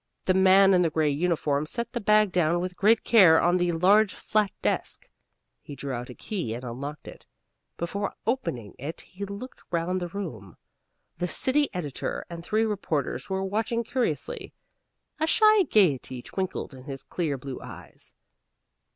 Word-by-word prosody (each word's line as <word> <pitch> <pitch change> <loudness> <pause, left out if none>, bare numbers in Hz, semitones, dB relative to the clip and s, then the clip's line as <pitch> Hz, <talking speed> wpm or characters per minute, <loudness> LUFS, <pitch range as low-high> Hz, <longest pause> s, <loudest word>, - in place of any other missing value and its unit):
The 185 - +3
man 190 +1 +6
in 180 - +4
the 170 - +3
gray 155 -1 +1
uniform 150 -2 0
set 235 +7 -3
the 240 - -1
bag 210 -2 +4
down 175 -1 +2
with 180 0 -4
great 215 +4 +3
care 185 -9 +7
on 175 +1 +3
the 175 -1 +1
large 195 +5 +4
flat 215 -2 +1
desk. - - -1 0.5
He 145 - -9
drew 140 -1 -5
out 120 0 -5
a 125 - -9
key 175 - -4
and 120 - -7
unlocked 140 +5 -6
it. - - -12 0.5
Before 200 +4 -3
opening 170 - -2
it 150 +6 -6
he 200 +2 -8
looked 200 +6 -8
round 180 +2 -1
the 175 - -2
room. 145 - -7 0.6
The 180 - 0
city 270 - +2
editor 150 -8 -4
and 170 0 -7
three 215 +5 +1
reporters 190 -10 -2
were 190 0 -1
watching 220 +4 -1
curiously. 230 - -3 0.7
A 315 - +1
shy 430 +3 +5
gayety 135 - +2
twinkled 185 -6 -4
in 130 -1 -12
his 135 -2 -7
clear 155 -6 -2
blue 135 0 -7
eyes. - - -9
180 Hz, 165 wpm, -26 LUFS, 145-210 Hz, 0.7 s, care